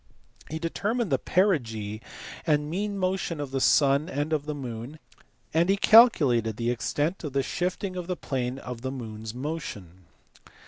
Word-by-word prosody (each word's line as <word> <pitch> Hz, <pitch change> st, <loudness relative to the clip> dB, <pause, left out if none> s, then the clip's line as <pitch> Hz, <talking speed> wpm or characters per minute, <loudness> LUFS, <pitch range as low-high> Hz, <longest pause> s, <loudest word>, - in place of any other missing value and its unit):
He 160 Hz, -, -3 dB
determined 200 Hz, +6 st, -1 dB
the 135 Hz, -, +3 dB
perigee 115 Hz, -, 0 dB, 0.5 s
and 150 Hz, -1 st, +2 dB
mean 200 Hz, +3 st, -2 dB
motion 185 Hz, -3 st, -1 dB
of 145 Hz, -2 st, -4 dB
the 135 Hz, -1 st, -1 dB
sun 140 Hz, +4 st, +4 dB
and 150 Hz, -1 st, -2 dB
of 150 Hz, -1 st, -1 dB
the 150 Hz, -, -2 dB
moon, 125 Hz, +1 st, -6 dB, 0.6 s
and 170 Hz, +3 st, +3 dB
he 195 Hz, -, +4 dB
calculated 140 Hz, -, +6 dB
the 120 Hz, 0 st, 0 dB
extent 145 Hz, -, -1 dB
of 150 Hz, -4 st, -5 dB
the 135 Hz, -1 st, +1 dB
shifting 185 Hz, +5 st, -2 dB
of 180 Hz, -2 st, -5 dB
the 180 Hz, -1 st, -2 dB
plane 125 Hz, -1 st, -3 dB
of 125 Hz, -3 st, -7 dB
the 130 Hz, -, -3 dB
moon 110 Hz, -5 st, -7 dB
s 110 Hz, +1 st, -6 dB
motion. 105 Hz, -, -6 dB
145 Hz, 170 wpm, -27 LUFS, 125-175 Hz, 0.6 s, calculated